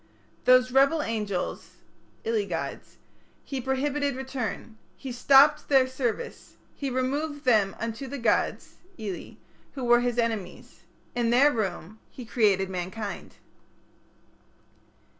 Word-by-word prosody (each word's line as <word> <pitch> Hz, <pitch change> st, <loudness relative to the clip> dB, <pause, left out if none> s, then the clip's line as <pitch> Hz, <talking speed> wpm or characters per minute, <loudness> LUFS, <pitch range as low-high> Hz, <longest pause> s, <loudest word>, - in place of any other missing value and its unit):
Those 255 Hz, 0 st, +5 dB
rebel 275 Hz, +4 st, +4 dB
angels 210 Hz, -5 st, -3 dB, 0.5 s
(ili 450 Hz, -2 st, 0 dB
gods) -, -, -5 dB, 0.5 s
He 270 Hz, -2 st, -4 dB
prohibited 280 Hz, +2 st, -1 dB
return; 255 Hz, -4 st, -5 dB, 0.2 s
He 265 Hz, -, -7 dB
stopped 270 Hz, +4 st, +5 dB
their 270 Hz, -2 st, +5 dB
service; 260 Hz, -, -4 dB, 0.2 s
He 280 Hz, -, -3 dB
removed 285 Hz, +3 st, -2 dB
them 215 Hz, -6 st, +3 dB
unto 230 Hz, +4 st, -4 dB
the 280 Hz, -, -5 dB
gods 235 Hz, -, 0 dB, 0.2 s
(ili) 205 Hz, -5 st, -6 dB, 0.4 s
who 270 Hz, -, -6 dB
were 240 Hz, 0 st, +5 dB
His 245 Hz, -1 st, -1 dB
enemies. 220 Hz, -6 st, -3 dB, 0.3 s
In 240 Hz, -1 st, 0 dB
their 265 Hz, +5 st, +5 dB
room 205 Hz, -, -4 dB
he 250 Hz, -, -10 dB
created 205 Hz, -5 st, +2 dB
mankind. 190 Hz, +3 st, -6 dB
250 Hz, 115 wpm, -27 LUFS, 220-275 Hz, 0.5 s, Those